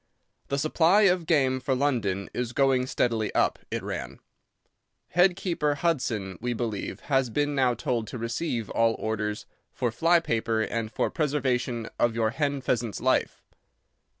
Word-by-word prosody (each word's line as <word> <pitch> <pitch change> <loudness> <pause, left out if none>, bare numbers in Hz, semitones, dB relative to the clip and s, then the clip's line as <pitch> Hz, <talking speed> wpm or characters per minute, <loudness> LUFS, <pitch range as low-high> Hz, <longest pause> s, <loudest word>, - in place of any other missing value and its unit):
"The 140 - -1
supply 165 +7 +4
of 180 -4 +3
game 135 -5 +3
for 130 +1 0
London 110 -9 0
is 120 -1 -3
going 130 -2 +2
steadily 115 -4 0
up," - - +2
it - - -3
ran. - - -5 0.9
"Head 180 +1 +4
keeper 165 -6 -1
Hudson, 120 - -1
we 120 +1 -1
believe, 115 -3 -4
has 135 -3 +1
been 145 +5 0
now 130 -3 +2
told 115 -1 -2
to - - -6
receive 115 0 -3
all 115 -1 +2
orders 105 -1 -3 0.3
for 120 -2 -1
fly 165 +9 +4
paper 115 -6 0
and 110 -1 -3
for - - -1
preservation 130 -6 -1
of 120 -1 +2
your 110 -1 +1
hen 140 0 -1
pheasant's 120 -4 -1
life." - - 0
125 Hz, 150 wpm, -27 LUFS, 115-145 Hz, 0.9 s, supply